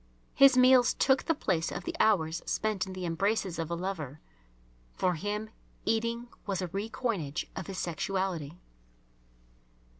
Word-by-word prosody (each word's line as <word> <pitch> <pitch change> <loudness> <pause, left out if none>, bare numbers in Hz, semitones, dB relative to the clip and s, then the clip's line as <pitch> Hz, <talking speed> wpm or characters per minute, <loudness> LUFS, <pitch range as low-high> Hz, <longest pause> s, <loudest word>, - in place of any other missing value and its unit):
His 275 -2 +7
meals 255 -1 +6
took 265 -1 +3
the 325 - +2
place 175 - 0
of - - -5
the 340 0 -4
hours 170 -7 +2
spent 210 -4 -1
in 190 - -6
the 185 -1 -5
embraces 185 +1 0
of 165 - -2
a 170 - -1
lover. 165 -6 -4 0.8
For 180 - +1
him 210 +5 -3 0.3
eating 230 +2 0 0.2
was 195 -3 -1
a 180 -2 -3
re 200 +5 -3
coinage 190 - -2
of - - -5
his 195 -2 -6
sexuality. 175 -2 -2
195 Hz, 150 wpm, -30 LUFS, 170-225 Hz, 0.8 s, His